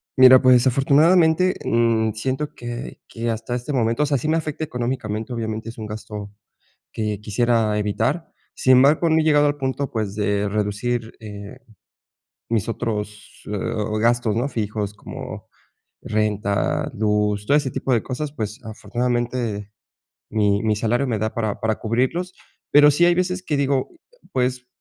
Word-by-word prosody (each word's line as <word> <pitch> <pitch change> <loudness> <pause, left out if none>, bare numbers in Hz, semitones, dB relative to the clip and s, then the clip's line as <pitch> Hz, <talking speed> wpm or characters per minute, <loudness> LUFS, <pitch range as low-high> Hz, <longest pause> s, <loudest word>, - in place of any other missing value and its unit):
Mira, 130 0 +8
pues, 130 -2 +5
afortunadamente, 160 +7 +4
mm, 115 -2 +2
siento 130 +6 -3
que 120 0 -7
que 115 0 -4
hasta 115 +2 -3
este 125 +4 -4
momento, 115 +3 +1
o - - +2
sea, 140 -1 +1
sí 125 - -4
me 160 +1 +2
afecta 155 -1 -3
económicamente. 120 -5 -3
Obviamente, 110 -1 -4
es 115 - -10
un 110 - -6
gasto 105 -1 -7 0.6
que 105 -2 -3
quisiera 110 0 +1
evitar. 130 +11 -1 0.2
Sin 130 - +3
embargo, 145 +6 +5
no 160 0 +4
he 155 - +2
llegado 150 -1 +4
al 145 0 0
punto, 135 0 -2
pues, 105 -3 -3
de 100 -1 0
reducir, 110 +3 -2
eh, 105 -2 -9 0.9
mis 115 -3 0
otros, 105 -2 -5
eh, 105 - -1 0.4
gastos, 115 -1 +2
no 120 +4 0
fijos 105 -5 -3
como - - -8 0.6
renta, 105 -2 0
luz, 105 -1 0
todo 145 - +4
ese 145 -3 +1
tipo 130 - -2
de 115 - +2
cosas. 140 +3 -4
Pues, 110 -5 -5
afortunadamente, 120 -2 -2 0.6
mi 105 -1 +1
mi 110 -1 +1
salario 120 +5 0
me 115 -4 -1
da 110 +1 -2
para 110 -3 -2
para 110 -1 0
cubrirlos, 130 +11 -1 0.4
pero 145 0 +7
sí 150 +4 +3
hay 175 - +4
veces 180 +1 -1
que 150 -5 -1
digo, 140 -1 +1 0.4
pues, 125 -1 -1
120 Hz, 155 wpm, -22 LUFS, 105-135 Hz, 0.9 s, Mira